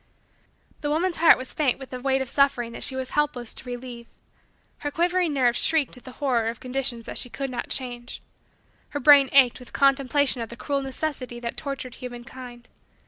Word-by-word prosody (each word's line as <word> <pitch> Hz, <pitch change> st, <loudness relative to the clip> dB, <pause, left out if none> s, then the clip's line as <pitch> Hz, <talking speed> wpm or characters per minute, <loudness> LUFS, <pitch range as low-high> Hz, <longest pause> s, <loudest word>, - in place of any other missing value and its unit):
The 290 Hz, -, -2 dB
woman's 335 Hz, +4 st, 0 dB
heart 330 Hz, 0 st, +7 dB
was 255 Hz, -, -5 dB
faint 280 Hz, -5 st, +1 dB
with 270 Hz, -1 st, -10 dB
the 255 Hz, -, -5 dB
weight 265 Hz, 0 st, +1 dB
of -, -, -10 dB
suffering 260 Hz, -4 st, +2 dB
that -, -, -6 dB
she 265 Hz, -, +1 dB
was 260 Hz, -1 st, -4 dB
helpless 290 Hz, -6 st, -1 dB
to 250 Hz, -, -9 dB
relieve. 245 Hz, -1 st, -7 dB, 0.7 s
Her 290 Hz, -, -2 dB
quivering 345 Hz, +2 st, +1 dB
nerves 245 Hz, -3 st, +3 dB
shrieked 315 Hz, -4 st, +2 dB
with 250 Hz, 0 st, -12 dB
the 255 Hz, -, -9 dB
horror 245 Hz, -6 st, 0 dB
of 230 Hz, +1 st, -3 dB
conditions 250 Hz, -2 st, -3 dB
that -, -, -4 dB
she 245 Hz, -, -4 dB
could 270 Hz, +1 st, -4 dB
not 245 Hz, -, -4 dB
change. 245 Hz, -2 st, -4 dB, 0.7 s
Her 290 Hz, -, -3 dB
brain 280 Hz, -1 st, +7 dB
ached 260 Hz, -3 st, +5 dB
with 250 Hz, -, -13 dB
contemplation 275 Hz, -1 st, +3 dB
of 225 Hz, -, -5 dB
the 235 Hz, -, -10 dB
cruel 280 Hz, 0 st, -1 dB
necessity 265 Hz, -2 st, -4 dB
that 235 Hz, -1 st, -4 dB
tortured 275 Hz, -4 st, -5 dB
humankind. 245 Hz, 0 st, -9 dB
260 Hz, 195 wpm, -25 LUFS, 245-280 Hz, 0.7 s, heart